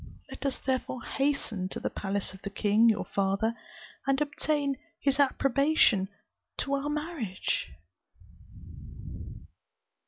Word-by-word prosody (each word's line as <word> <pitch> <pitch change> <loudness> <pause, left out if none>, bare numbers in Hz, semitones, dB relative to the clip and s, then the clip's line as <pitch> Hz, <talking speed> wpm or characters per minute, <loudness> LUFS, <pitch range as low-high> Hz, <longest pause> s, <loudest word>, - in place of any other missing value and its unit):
Let 285 - -3
us 270 - -1
therefore 260 -2 -2
hasten 250 -9 0
to - - -5
the - - -2
palace 200 -1 -2
of 190 - -12
the 200 - -4
king 210 +3 +4
your 215 -2 +1
father, 200 +3 +1 0.5
and 275 0 +3
obtain 290 -1 0 0.2
his 275 0 +1
approbation 275 -6 +4 0.5
to 280 - -1
our 280 +1 0
marriage." 295 - -2
265 Hz, 115 wpm, -29 LUFS, 200-285 Hz, 0.5 s, king